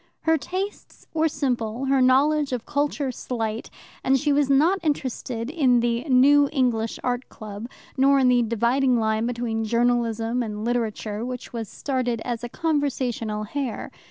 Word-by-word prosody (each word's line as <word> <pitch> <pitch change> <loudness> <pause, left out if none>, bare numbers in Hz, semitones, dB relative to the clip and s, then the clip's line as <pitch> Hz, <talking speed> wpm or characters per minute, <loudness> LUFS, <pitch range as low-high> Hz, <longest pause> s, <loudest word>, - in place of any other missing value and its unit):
Her 320 0 +3
tastes 375 +6 -5
were 320 0 +2
simple, 250 -5 -2
her 270 0 +3
knowledge 280 +2 +3
of 245 -2 -3
culture 285 -1 -1
slight, 225 -2 -4 0.3
and 270 0 +3
she 295 +1 +1
was 285 -1 +2
not 315 +8 +4
interested 260 -5 -2
in 265 -7 +3
the 235 0 0
New 285 +1 +5
English 240 -6 0
Art 250 0 -2
Club, 215 +1 -8 0.3
nor 275 +1 +5
in 265 -2 +4
the 250 -1 +4
dividing 235 +3 +2
line 220 +1 0
between 235 -2 -2
Journalism 235 0 +1
and 215 -2 -4
Literature, 225 -2 -2
which 250 0 -6
was 225 -4 -4
started 255 -4 -2
as 240 -1 -3
a 240 - -4
conversational 255 -9 -1
hare. 255 +1 -4
250 Hz, 155 wpm, -24 LUFS, 230-280 Hz, 0.3 s, New